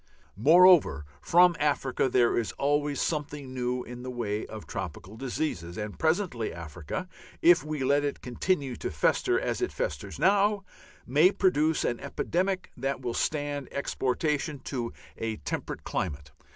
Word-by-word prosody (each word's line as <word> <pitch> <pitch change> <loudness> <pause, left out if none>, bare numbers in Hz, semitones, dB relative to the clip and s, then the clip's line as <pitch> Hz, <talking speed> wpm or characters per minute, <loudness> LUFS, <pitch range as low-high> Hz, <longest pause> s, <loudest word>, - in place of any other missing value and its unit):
Moreover, 160 - +6 0.2
from 175 0 +5
Africa 140 -3 +1
there 120 -1 +3
is 115 -3 -1
always 145 0 0
something 145 -4 -3
new 125 0 -2
in 125 0 -9
the 130 - -6
way 110 -4 -3
of 110 -1 -8
tropical 95 +2 -6
diseases, 115 - -3
and 105 -1 -5
presently 160 - 0
Africa, 85 - -6 0.4
if 170 -3 +6
we 155 -2 -3
let 140 +2 +3
it 145 - -2
continue 135 +1 -1
to - - -3
fester 370 0 +2
as - - -2
it 370 - 0
festers - - -4
now, 200 +1 +3 0.4
may 150 +8 +5
produce 160 -6 +2
an 120 - -1
epidemic 185 +6 -2
that 135 +1 -2
will 120 -2 -3
stand 145 -1 -2
exportation 145 +2 -1
to 120 -4 -4 0.3
a 115 -1 -2
temperate 75 - -5
climate. 75 -4 -3
140 Hz, 145 wpm, -28 LUFS, 120-160 Hz, 0.4 s, Moreover